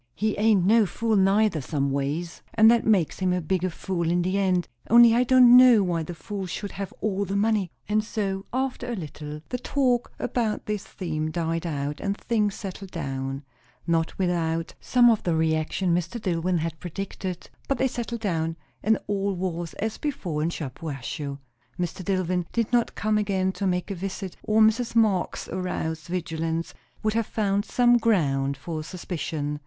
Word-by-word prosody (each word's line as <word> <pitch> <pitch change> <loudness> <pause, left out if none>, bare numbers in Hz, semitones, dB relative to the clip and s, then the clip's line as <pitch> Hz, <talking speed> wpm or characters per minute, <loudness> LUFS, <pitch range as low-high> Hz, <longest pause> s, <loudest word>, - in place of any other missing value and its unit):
He 215 0 0
ain't 210 -4 +4
no 220 +1 +5
fool 225 +4 0
neither, 195 -3 +3
some 140 0 -1
ways; 145 +5 -2
and 220 0 +7
that 235 -1 +2
makes 195 -8 +2
him 185 -1 +1
a 180 - +1
bigger 185 +2 0
fool 170 -1 -2
in 175 +1 +2
the 185 +2 0
end; 185 -3 +1 0.2
only 235 0 +8
I 240 +2 +4
don't 250 -1 +7
know 250 -4 +8
why 175 -3 0
the 170 +2 -6
fools 190 +4 -5
should 200 +3 -4
have 195 -1 -5
all 200 -2 0
the 195 0 -3
money." 205 -2 +1 0.2
And 215 +1 +2
so, 195 -3 -3
after 255 -1 -2
a - - -2
little, 150 -4 -7
the 250 - -3
talk 250 -2 +1
about 225 -4 -1
this 210 -2 -2
theme 155 -4 -3
died 165 +1 -2
out, 145 -1 -3
and 200 0 -2
things 210 -4 0
settled 195 0 -7
down, 135 -4 -4 0.4
not 165 -1 0
without 165 -3 -1
some 245 -1 +4
of 220 - +1
the 170 -2 0
reaction 160 +3 +1
Mr. 175 +7 -1
Dillwyn 180 -2 0
had 160 0 -3
predicted; 185 0 -6 0.2
but 275 - 0
they 265 - +2
settled 235 -2 -4
down, 165 -5 -1 0.2
and 220 0 +3
all 200 -1 -1
was 175 -2 -3
as 220 +1 -3
before 180 - -2
in 160 - +1
Shampuashuh. 140 -2 -5 0.4
Mr. 180 +1 -3
Dillwyn 180 -2 0
did 235 0 -1
not 240 -1 +2
come 215 0 +1
again 190 -2 0
to 195 +1 -2
make 180 +2 -1
a - - 0
visit, 190 0 -5
or 215 +1 +2
Mrs. 225 +2 +3
Marx's 215 -5 +1
aroused 160 -3 -3
vigilance 165 -1 -2 0.3
would 215 0 +1
have 230 -1 0
found 205 -1 0
some 240 0 +4
ground 140 -11 +1
for 155 +3 -5
suspicion. 155 -4 -4
185 Hz, 180 wpm, -25 LUFS, 165-215 Hz, 0.4 s, only